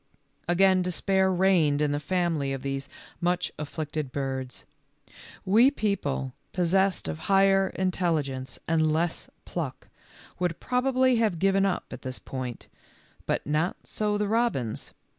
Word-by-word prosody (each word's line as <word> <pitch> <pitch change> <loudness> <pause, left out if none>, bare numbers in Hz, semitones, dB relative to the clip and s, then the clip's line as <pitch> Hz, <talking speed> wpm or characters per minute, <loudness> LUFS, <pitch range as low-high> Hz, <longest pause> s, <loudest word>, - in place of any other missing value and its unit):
Again 185 +2 +4
despair 190 +1 +1
reigned 175 -6 +3
in 150 -1 +2
the 145 - 0
family 165 -4 0
of 135 - -5
these 135 0 -3 0.3
much 175 +1 0
afflicted 150 -1 -4
birds. 130 -2 -4 0.8
We 225 +7 +6
people, 185 - -2 0.2
possessed 190 - +2
of 80 -1 -4
higher 195 0 +5
intelligence 155 -9 -1
and 160 -1 +2
less 165 +2 -1 0.2
pluck, - - -5 0.5
would 180 -2 -1
prob 250 +1 0
ably 255 -1 +3
have 215 -6 +1
given 195 +2 +3
up 190 - -1
at - - -7
this 130 -1 -5
point, 130 -3 -6 0.6
but - - 0
not 155 +5 0
so 210 -1 -1
the 210 0 0
robins. 215 - -1
175 Hz, 135 wpm, -27 LUFS, 145-195 Hz, 0.8 s, We